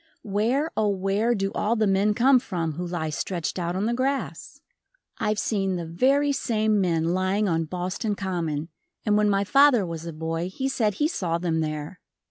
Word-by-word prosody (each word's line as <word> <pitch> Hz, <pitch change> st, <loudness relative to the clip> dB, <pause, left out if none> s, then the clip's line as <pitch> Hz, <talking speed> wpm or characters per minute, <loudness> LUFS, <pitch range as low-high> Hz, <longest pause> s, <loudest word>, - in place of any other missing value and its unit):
Where, 230 Hz, +10 st, 0 dB
oh 215 Hz, -, +2 dB
where, 200 Hz, +4 st, +1 dB
do 195 Hz, -1 st, -1 dB
all 220 Hz, +3 st, 0 dB
the 215 Hz, -1 st, +2 dB
men 200 Hz, +1 st, +2 dB
come 260 Hz, +3 st, +5 dB
from 170 Hz, -9 st, -3 dB
who 175 Hz, +4 st, -5 dB
lie 165 Hz, -3 st, -3 dB
stretched 170 Hz, +4 st, -3 dB
out 175 Hz, 0 st, -2 dB
on 195 Hz, +3 st, 0 dB
the 235 Hz, -, 0 dB
grass? 265 Hz, +3 st, -2 dB, 0.6 s
I've 215 Hz, 0 st, 0 dB
seen 195 Hz, -3 st, 0 dB
the 170 Hz, -1 st, -4 dB
very 270 Hz, -, +2 dB
same 220 Hz, -6 st, +1 dB
men 165 Hz, -2 st, +1 dB
lying 190 Hz, +3 st, +1 dB
on 165 Hz, -2 st, 0 dB
Boston 185 Hz, +6 st, -3 dB
Common, 165 Hz, -5 st, -3 dB, 0.4 s
and 210 Hz, -1 st, +3 dB
when 210 Hz, 0 st, +3 dB
my 200 Hz, 0 st, +2 dB
father 275 Hz, -1 st, +5 dB
was 165 Hz, -1 st, -6 dB
a -, -, -4 dB
boy 165 Hz, +2 st, -3 dB
he 265 Hz, +8 st, -3 dB
said 220 Hz, -6 st, 0 dB
he 295 Hz, +8 st, +2 dB
saw 175 Hz, -, -1 dB
them 170 Hz, -2 st, -1 dB
there. 155 Hz, +3 st, -4 dB
195 Hz, 190 wpm, -25 LUFS, 170-220 Hz, 0.6 s, come